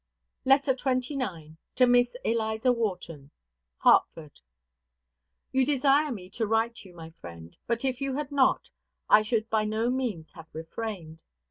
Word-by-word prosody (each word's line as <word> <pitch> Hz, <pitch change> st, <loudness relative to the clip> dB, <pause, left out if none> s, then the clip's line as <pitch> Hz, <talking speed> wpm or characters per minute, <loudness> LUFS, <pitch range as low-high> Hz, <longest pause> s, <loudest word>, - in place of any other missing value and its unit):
LETTER 270 Hz, +1 st, +4 dB
XXIX. 250 Hz, -, -3 dB, 0.2 s
TO 255 Hz, -, +5 dB
MISS 245 Hz, 0 st, +3 dB
ELIZA 220 Hz, +1 st, +1 dB
WHARTON. 180 Hz, -, -4 dB, 0.5 s
HARTFORD. 155 Hz, -3 st, +2 dB, 1.1 s
You 265 Hz, 0 st, +2 dB
desire 285 Hz, +2 st, +2 dB
me 190 Hz, -6 st, -7 dB
to 220 Hz, +1 st, -2 dB
write 225 Hz, +2 st, +1 dB
to 195 Hz, -, -12 dB
you, 175 Hz, -, -17 dB
my 165 Hz, -1 st, -10 dB
friend; 85 Hz, -, -12 dB
but 235 Hz, +2 st, -1 dB
if 260 Hz, 0 st, -2 dB
you 275 Hz, -1 st, -2 dB
had 290 Hz, 0 st, -4 dB
not, 275 Hz, -2 st, +2 dB, 0.4 s
I 215 Hz, -, +8 dB
should 215 Hz, 0 st, -1 dB
by 215 Hz, -1 st, +2 dB
no 220 Hz, +3 st, 0 dB
means 235 Hz, -11 st, -3 dB
have 160 Hz, -, -13 dB
refrained. 165 Hz, -1 st, -7 dB
225 Hz, 145 wpm, -27 LUFS, 175-260 Hz, 1.1 s, I